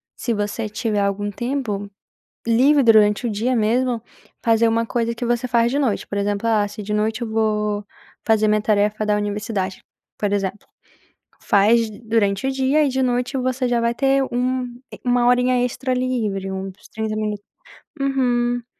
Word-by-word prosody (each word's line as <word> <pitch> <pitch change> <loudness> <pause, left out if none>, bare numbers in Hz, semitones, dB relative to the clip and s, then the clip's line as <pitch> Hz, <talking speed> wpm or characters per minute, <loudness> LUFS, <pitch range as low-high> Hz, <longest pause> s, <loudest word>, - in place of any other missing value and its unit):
se 235 - -2
você 210 +1 -2
tiver 210 0 -1
algum 200 +1 -1
tempo 215 -3 -3 0.6
livre, 270 +5 +4
durante 215 -1 +4
o - - -1
dia 225 +5 0
mesmo 235 +2 +1 0.4
fazer 230 0 +3
uma 230 0 +1
coisa 235 -1 -1
que 235 +1 -5
você 240 +1 0
faz 235 -1 +3
de 280 - 0
noite, 255 -8 0
por 205 - -5
exemplo, 205 +2 -1
ah 215 -2 +3
se 210 - -8
de 210 +1 -4
noite 220 +2 0
eu 235 - -2
vou 210 -2 0 0.4
fazer 215 -1 +3
minha 210 0 +2
tarefa 210 0 +1
da 210 - +2
universidade, 205 -2 -3 0.3
por 205 -1 -1
exemplo, 200 0 -2 0.7
faz 225 +3 +3 0.2
durante 215 0 +1
o - - +1
dia 265 +3 +2
e - - +2
de 265 0 0
noite 250 +1 0
você 255 0 -1
já 240 -1 +1
vai 235 0 +1
ter 270 +1 +2
um 250 +1 0 0.3
e - - -10
1 245 0 +3
horinha 250 0 +3
extra 255 +1 -2
livre, 225 -7 -1
uns 190 0 -7
30 220 -1 -3
minutos 210 -1 -3 0.6
uhum. 245 -3 +1
225 Hz, 170 wpm, -21 LUFS, 210-250 Hz, 0.7 s, livre